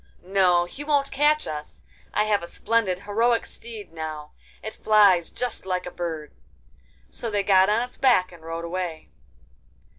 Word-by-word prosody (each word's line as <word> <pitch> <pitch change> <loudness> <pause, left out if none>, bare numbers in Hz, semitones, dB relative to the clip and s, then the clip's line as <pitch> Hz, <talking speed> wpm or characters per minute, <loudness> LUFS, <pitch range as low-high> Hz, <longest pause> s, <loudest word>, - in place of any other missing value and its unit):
'No, 180 -2 +3
he 270 +11 -9
won't 285 -2 +1
catch 295 +2 +3
us! 150 -1 -7 0.3
I - - +2
have 210 -1 +1
a 170 - -7
splendid 205 -4 0
heroic 230 +4 +1
steed 225 -6 -10
now; 155 -2 -6 0.3
it 220 - -5
flies 200 -6 +4
just 250 -1 -4
like 185 -1 -2
a 180 - -6
bird.' 160 -4 -5 0.8
So 235 - -5
they 205 -2 0
got 190 -1 +5
on 220 +3 +2
its 250 - -10
back 210 -9 +4
and 175 -2 -14
rode 165 +1 -5
away. 170 -2 -4
190 Hz, 160 wpm, -25 LUFS, 170-230 Hz, 0.8 s, got